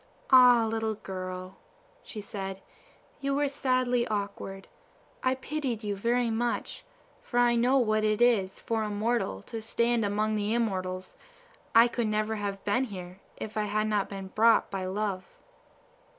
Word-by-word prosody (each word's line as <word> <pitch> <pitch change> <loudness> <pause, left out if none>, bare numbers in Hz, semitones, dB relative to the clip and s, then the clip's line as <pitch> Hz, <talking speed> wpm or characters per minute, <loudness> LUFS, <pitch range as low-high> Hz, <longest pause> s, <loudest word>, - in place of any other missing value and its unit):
"Ah, 250 -3 +8
little 220 0 -1
girl," 185 -1 -7 0.4
she 215 - -7
said, 195 -2 -6 0.6
"you 275 0 -1
were 290 0 +2
sadly 255 -3 +1
awkward. 200 -2 -4 0.5
I 255 0 +2
pitied 260 -4 -3
you 205 -1 -2
very 235 +3 +1
much, 240 - -2 0.4
for 240 - -5
I 240 0 +5
know 245 +3 +3
what 215 -4 +2
it 215 -1 +1
is 220 -6 +3
for 225 -1 -1
a 215 - -2
mortal 210 - -1
to 225 - -6
stand 235 +1 +1
among 210 +1 0
the 210 +1 0
immortals; 185 -5 -2 0.6
I 230 +1 +8
never 215 -1 0
could - - -5
have 200 -1 -4
been 205 +6 +2
here 185 -4 -9 0.2
if 220 - -6
I 210 - +1
had 215 +1 0
not 210 -2 0
been 195 -1 -7
brought 225 +3 +4
by 190 -2 -3
Love." 195 -1 -3
215 Hz, 155 wpm, -28 LUFS, 200-240 Hz, 0.6 s, Ah